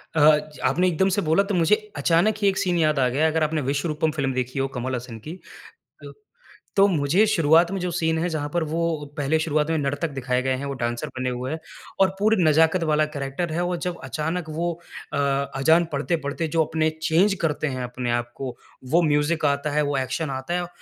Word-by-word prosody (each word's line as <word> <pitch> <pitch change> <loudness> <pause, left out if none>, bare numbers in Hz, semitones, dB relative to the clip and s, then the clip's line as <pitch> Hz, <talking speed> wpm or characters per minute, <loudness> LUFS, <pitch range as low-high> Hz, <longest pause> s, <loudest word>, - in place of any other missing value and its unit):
अ, 155 - +3 0.3
च - - -14
आपने 180 +2 +2
एकदम 180 +2 +2
से 205 - +1
बोला 165 +3 +3
तो 200 - 0
मुझे 175 +3 +4 0.2
अचानक 170 +8 +3
ही 200 - +3
एक 195 -1 +2
सीन 180 -1 +1
याद 155 -3 +2
आ 130 - +3
गया, 145 +6 +2
अगर 160 0 +1
आपने 155 0 0
"विश्वरूपम" 150 +3 -1
फ़िल्म 140 -3 -1
देखी 130 +1 -2
हो 135 - +1
कमल 130 +1 -2
हसन 120 -1 -7
की 170 +4 -7 0.6
तो - - -9 0.7
तो 195 +1 +7
मुझे 170 +3 +2
शुरुआत 170 -3 +4
में 195 - -2
जो 180 - -1
सीन 160 -1 0
है 175 - 0
जहाँ 150 -3 -3
पर 175 - +1
वो 160 +2 -2 0.4
पहले 145 +2 +1
शुरुआत 155 -1 0
में 160 - +1
नर्तक 145 +3 -1
दिखाए 125 -2 -1
गए 130 0 +1
हैं, 135 +2 -5
वो 140 - -3
डान्सर 120 +2 -3
बने 130 0 -1
हुए 125 +2 -4
हैं 160 - -3 0.4
और 190 - +6
पूरी 210 -3 +3
नजाकत 160 +3 +4
वाला 155 0 +3
कैरेक्टर 145 +4 -3
है। 170 - -1
वो 175 0 -1
जब 180 - -3
अचानक 160 +3 -3
वो 170 +3 -1 0.4
अ, - - -1
अजान 140 +4 +2
पढ़ते-पढ़ते 150 +2 -2
जो 160 - +5
अपने 160 0 0
चेंज 175 +6 +3
करते 155 -1 0
हैं 130 - -4
अपने 125 0 -3
आप 120 0 -1
को, 130 -3 -6 0.3
वो 165 +7 +3
म्यूजिक 150 +1 +1
आता 140 +1 0
है, 150 +1 +2
वो 145 -1 -1
एक्शन 135 +4 -2
आता 130 +5 -4
है, 175 - -5
155 Hz, 220 wpm, -24 LUFS, 140-170 Hz, 0.7 s, तो